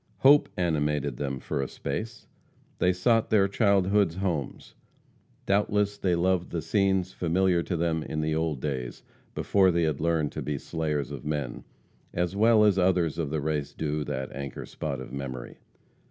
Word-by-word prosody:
Hope 145 Hz, +2 st, +6 dB
animated 75 Hz, -6 st, 0 dB
them 70 Hz, -2 st, -3 dB
for 70 Hz, -, -3 dB
a 70 Hz, -, -2 dB
space. 110 Hz, 0 st, -5 dB, 0.5 s
They 90 Hz, -, +4 dB
sought 115 Hz, +5 st, +2 dB
their 100 Hz, -3 st, +4 dB
childhood's 100 Hz, -3 st, +2 dB
homes. 90 Hz, -7 st, -3 dB, 0.7 s
Doubtless 105 Hz, 0 st, +1 dB
they 95 Hz, -3 st, 0 dB
loved 90 Hz, +1 st, +1 dB
the 85 Hz, -3 st, -3 dB
scenes 95 Hz, +1 st, +1 dB
familiar 90 Hz, +1 st, +2 dB
to 85 Hz, 0 st, -3 dB
them 80 Hz, -1 st, 0 dB
in 75 Hz, 0 st, -3 dB
the 80 Hz, 0 st, 0 dB
old 80 Hz, -3 st, -1 dB
days, 65 Hz, -5 st, -4 dB, 0.3 s
before 95 Hz, -2 st, +3 dB
they 85 Hz, -1 st, +2 dB
had 75 Hz, -3 st, -1 dB
learned 80 Hz, -3 st, +1 dB
to -, -, -5 dB
be 75 Hz, -1 st, -2 dB
slayers 75 Hz, -3 st, -2 dB
of -, -, -7 dB
men, 75 Hz, -4 st, -3 dB, 0.5 s
as 90 Hz, +2 st, -1 dB
well 110 Hz, +1 st, +5 dB
as 100 Hz, -3 st, +4 dB
others 90 Hz, -4 st, +2 dB
of 80 Hz, -4 st, -1 dB
the 75 Hz, 0 st, -2 dB
race 75 Hz, -1 st, -2 dB
do 75 Hz, -1 st, -2 dB
that 65 Hz, -2 st, -4 dB
anchor 70 Hz, -2 st, -6 dB
spot 70 Hz, -4 st, -4 dB
of 65 Hz, -1 st, -9 dB
memory. 65 Hz, -3 st, -6 dB
85 Hz, 170 wpm, -27 LUFS, 75-95 Hz, 0.7 s, Hope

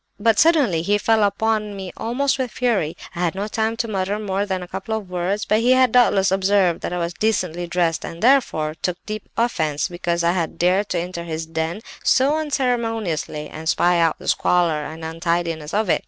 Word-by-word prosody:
But 220 Hz, 0 st, +3 dB
suddenly 285 Hz, -, +4 dB
he 205 Hz, +5 st, +2 dB
fell 220 Hz, +1 st, +2 dB
upon 210 Hz, +1 st, 0 dB
me 190 Hz, -2 st, -7 dB
almost 270 Hz, +4 st, -1 dB
with 255 Hz, -1 st, -1 dB
fury; 215 Hz, -9 st, -1 dB, 0.2 s
I -, -, -6 dB
had -, -, 0 dB
had 170 Hz, -, -1 dB
no 200 Hz, +2 st, -3 dB
time 220 Hz, +1 st, -1 dB
to 230 Hz, -, -1 dB
mutter 200 Hz, -1 st, -1 dB
more 200 Hz, -1 st, -2 dB
than 190 Hz, -2 st, -2 dB
a -, -, -9 dB
couple 220 Hz, +4 st, -3 dB
of 200 Hz, -4 st, -9 dB
words; 185 Hz, +4 st, -1 dB
but 215 Hz, -, +2 dB
he 245 Hz, +3 st, +4 dB
had 255 Hz, -2 st, +4 dB
doubtless 205 Hz, -6 st, +4 dB
observed 190 Hz, -2 st, +2 dB
that -, -, -4 dB
I 180 Hz, -, -2 dB
was 170 Hz, 0 st, -2 dB
decently 180 Hz, -6 st, -1 dB
dressed 170 Hz, -2 st, 0 dB
and, 165 Hz, -, -7 dB
therefore, 235 Hz, -, +3 dB
took 180 Hz, -1 st, -1 dB
deep 215 Hz, -1 st, -6 dB
offence 160 Hz, -11 st, 0 dB
because 175 Hz, -1 st, -2 dB
I 170 Hz, -, +3 dB
had 175 Hz, -3 st, -2 dB
dared 185 Hz, +3 st, +1 dB
enter 175 Hz, 0 st, -3 dB
his 160 Hz, -1 st, -4 dB
den 165 Hz, +4 st, -3 dB, 0.2 s
so 270 Hz, +3 st, +3 dB
unceremoniously, 225 Hz, -, -1 dB
and 160 Hz, +1 st, -5 dB
spy 175 Hz, +1 st, +3 dB
out 165 Hz, -1 st, +2 dB
the -, -, -11 dB
squalor 170 Hz, -4 st, +2 dB
and 160 Hz, +1 st, -7 dB
untidiness 165 Hz, -1 st, -2 dB
of 215 Hz, +1 st, 0 dB
it. -, -, +2 dB
190 Hz, 205 wpm, -21 LUFS, 170-220 Hz, 0.2 s, suddenly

